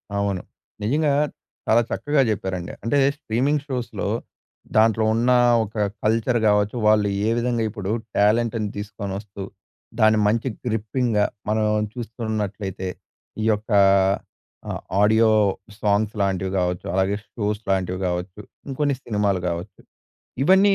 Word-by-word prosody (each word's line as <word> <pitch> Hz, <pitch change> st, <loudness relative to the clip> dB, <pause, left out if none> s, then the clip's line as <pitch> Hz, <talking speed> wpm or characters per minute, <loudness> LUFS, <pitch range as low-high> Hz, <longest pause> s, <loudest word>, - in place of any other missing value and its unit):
అవును. 100 Hz, -2 st, 0 dB, 0.4 s
నిజంగా. 145 Hz, +6 st, +2 dB, 0.5 s
చాలా 115 Hz, +2 st, +5 dB
చక్కగా 145 Hz, -1 st, +1 dB
చెప్పారండి. 95 Hz, -4 st, -3 dB
అంటే, 115 Hz, +5 st, +1 dB, 0.2 s
స్ట్రీమింగ్ 140 Hz, +2 st, 0 dB
షోస్‌లొ. 125 Hz, -4 st, -3 dB, 0.7 s
దాంట్లో 110 Hz, 0 st, +4 dB
ఉన్న 120 Hz, +2 st, +2 dB, 0.3 s
ఒక 110 Hz, +1 st, -9 dB, 0.3 s
కల్చర్ 115 Hz, +2 st, +2 dB
గావచ్చు. 105 Hz, +1 st, +3 dB
వాళ్ళు 105 Hz, -1 st, +4 dB, 0.2 s
ఏ -, -, +3 dB
విధంగా 120 Hz, -1 st, 0 dB
ఇప్పుడు 105 Hz, -2 st, -4 dB, 0.3 s
టాలెంట్‌ని 110 Hz, +1 st, +2 dB
తీసుకొని 100 Hz, -1 st, -5 dB
వస్తు, 100 Hz, -1 st, -8 dB, 0.6 s
దాని 110 Hz, 0 st, +5 dB
మంచి 115 Hz, +4 st, +1 dB, 0.2 s
గ్రిప్పింగ్‌గా. 110 Hz, -1 st, 0 dB, 0.2 s
మనం 110 Hz, 0 st, +2 dB, 0.3 s
చూస్తూ 115 Hz, -1 st, -7 dB
ఉన్నట్లయితే. 100 Hz, -3 st, -3 dB, 0.5 s
ఈ -, -, 0 dB
యొక్క 110 Hz, +2 st, -3 dB, 1.0 s
ఆహ్, -, -, -3 dB, 0.2 s
ఆడియో 110 Hz, +2 st, +5 dB, 0.5 s
సాంగ్స్ 105 Hz, +1 st, +1 dB
లాంటివి 95 Hz, -1 st, 0 dB
కావచ్చు. 90 Hz, -1 st, -1 dB
అలాగే 95 Hz, +2 st, +1 dB, 0.2 s
షో‌స్ 105 Hz, -1 st, -2 dB
లాంటివి 95 Hz, -1 st, 0 dB
కావచ్చు. 90 Hz, +2 st, -4 dB, 0.3 s
ఇంకొన్ని 140 Hz, +1 st, 0 dB
సినిమాలు 105 Hz, -4 st, 0 dB
కావచ్చు. 85 Hz, +1 st, -6 dB, 0.6 s
ఇవన్నీ 190 Hz, +5 st, +5 dB
105 Hz, 120 wpm, -23 LUFS, 100-115 Hz, 1.0 s, చాలా